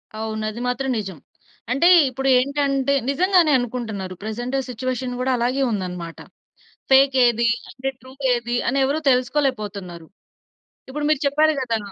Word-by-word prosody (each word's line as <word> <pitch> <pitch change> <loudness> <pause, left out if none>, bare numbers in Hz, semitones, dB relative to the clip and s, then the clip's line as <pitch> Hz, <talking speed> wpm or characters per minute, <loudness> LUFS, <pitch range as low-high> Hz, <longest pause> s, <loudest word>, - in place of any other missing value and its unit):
అవును. 220 0 -4
అది 235 +3 -8
మాత్రం 265 +2 -2
నిజం. 190 -5 -6 0.5
అంటే 275 +7 +3 0.2
ఇప్పుడు 270 +1 -2
ఏంటంటే 280 0 0 0.2
నిజంగానే 355 +1 +3
అనుకుంటున్నారు. 220 -6 -5
ప్రెజెంట్ 240 +5 -3
సిట్యుయేషన్ 250 0 -4
కూడా 260 +1 0
అలాగే 250 +3 0
ఉందన్నమాట. 180 -4 -5 0.7
ఫేక్ 270 0 +5
ఏది 235 0 +2 0.2
అంటే 265 +2 -5
ట్రూ 260 +2 -14 0.2
ఏది 240 0 -2
అని 275 +2 0
ఎవరు 285 +4 0
తెలుసుకోలేకపోతున్నారు. 215 - -1 0.8
ఇప్పుడు 295 +2 -4
మీరు 305 - +2
చెప్పారు 310 +2 +3
కదా! 230 -3 -1
250 Hz, 130 wpm, -22 LUFS, 220-275 Hz, 0.8 s, ఫేక్